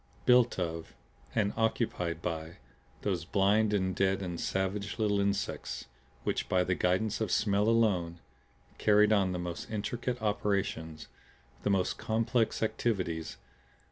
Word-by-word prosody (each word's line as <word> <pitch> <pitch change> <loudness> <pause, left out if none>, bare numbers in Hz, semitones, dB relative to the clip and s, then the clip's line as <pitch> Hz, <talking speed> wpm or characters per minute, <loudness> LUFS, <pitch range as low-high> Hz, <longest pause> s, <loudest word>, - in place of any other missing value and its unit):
Built 125 -1 +5
of 80 -3 -4 0.4
and 105 -3 +1
occupied 110 -7 -1
by 80 0 -4 0.5
those 95 -5 -1
blind 100 +4 +2
and 95 -3 0
deaf 95 0 +2
and 85 -2 -4
savage 95 +2 -2
little 105 -3 +1
insects 100 0 -2 0.4
which - - -1
by 90 -1 +3
the 90 - 0
guidance 95 +5 0
of 110 - 0
smell 105 +1 +2
alone 95 -7 +2 0.6
carried 105 0 +5
on 95 -3 +3
the 90 - -2
most 90 -1 -5
intricate 120 +3 -3
operations, 100 -7 -1 0.5
the - - 0
most 95 -2 +1
complex 115 +1 0
activities. 95 -8 -1
100 Hz, 130 wpm, -31 LUFS, 90-110 Hz, 0.6 s, Built